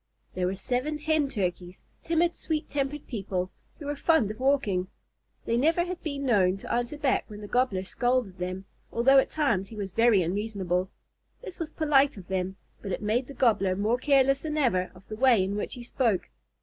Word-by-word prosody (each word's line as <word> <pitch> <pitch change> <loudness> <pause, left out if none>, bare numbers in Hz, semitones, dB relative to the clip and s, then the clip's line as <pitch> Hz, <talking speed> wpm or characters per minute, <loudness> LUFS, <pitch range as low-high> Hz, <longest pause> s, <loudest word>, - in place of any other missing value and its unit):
There 180 -1 0
were 190 - -1
seven 255 +9 -1
Hen 305 -1 +1
Turkeys, 180 -5 -3 0.2
timid, 335 +1 +1
sweet 310 -1 -3
tempered 285 +1 -3
people, 190 -5 -3 0.3
who 300 - -9
were 290 +1 -2
fond 280 -8 +2
of 215 - -10
walking. 255 -9 +1 0.6
They - - -3
had 235 +1 +2
never 345 +4 +2
been 285 -5 -5
known 195 -6 +3
to - - -5
answer 245 +5 -1
back 290 -3 +1
when 210 -1 -9
the 210 - -8
Gobbler 245 -6 +1
scolded 245 -2 -1
them, 185 +2 -4 0.3
although 270 +4 +5
at - - +1
times 230 -11 0
he 225 - -11
was 200 -2 -4
very 225 -2 +4
unreasonable. 185 -1 -1 0.5
This 390 -6 -9
was 325 -2 -3
polite 290 -5 +3
of 185 -2 -11
them, 190 0 -2 0.3
but 200 - -5
it 195 - -3
made 235 +5 0
the 280 - -10
Gobbler 210 -6 +2
more 215 +5 +1
careless 275 0 +3
than 310 -1 -3
ever 185 -11 +2
of 180 - -17
the 215 - -6
way 240 -4 +4
in 195 +2 -2
which 210 - -3
he 245 - -8
spoke. 235 -5 0
235 Hz, 200 wpm, -27 LUFS, 195-280 Hz, 0.6 s, although